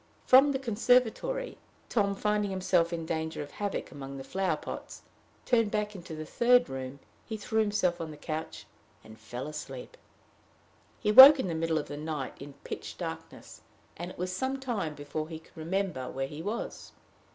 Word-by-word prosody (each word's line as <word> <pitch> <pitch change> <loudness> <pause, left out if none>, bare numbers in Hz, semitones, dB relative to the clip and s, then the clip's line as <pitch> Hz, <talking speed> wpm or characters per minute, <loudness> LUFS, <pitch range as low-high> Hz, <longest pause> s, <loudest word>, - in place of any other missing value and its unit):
From 270 +3 +7
the 270 - 0
conservatory, 250 - +1 0.3
Tom, 200 -3 +1
finding 210 0 0
himself 180 -3 +1
in 165 -1 -3
danger 160 -1 -3
of 145 - -12
havoc 205 +3 -4
among 140 -2 -8
the 135 - -7
flower 185 0 -1
pots, - - -8 0.4
turned 230 -4 +3
back 210 0 -1
into 175 -4 -8
the 155 0 -6
third 245 +7 +4
room, 130 0 -6 0.4
threw 220 +1 -1
himself 185 -5 0
on 160 -1 -5
a 150 - -10
couch, 155 -10 -5 0.4
and 110 0 -14
fell 120 +3 -6
fast 150 0 -5
asleep. 130 -2 -10 1.0
He 210 - +1
woke 270 +6 +12
in 190 - -1
the - - -1
middle 165 0 0
of 150 - -3
the 145 - -6
night 150 -3 -4
in 140 +1 -9
pitch - - -7
darkness; - - -8 0.3
and 175 +2 -6
it - - -11
was 180 +1 -3
some 265 +6 -2
time 210 - -3
before 145 +2 -5
he 160 - -6
could 160 - -20
remember 165 -5 -2
where 135 0 -3
he 150 +3 -8
was. 210 +7 -5
175 Hz, 180 wpm, -29 LUFS, 150-210 Hz, 1.0 s, woke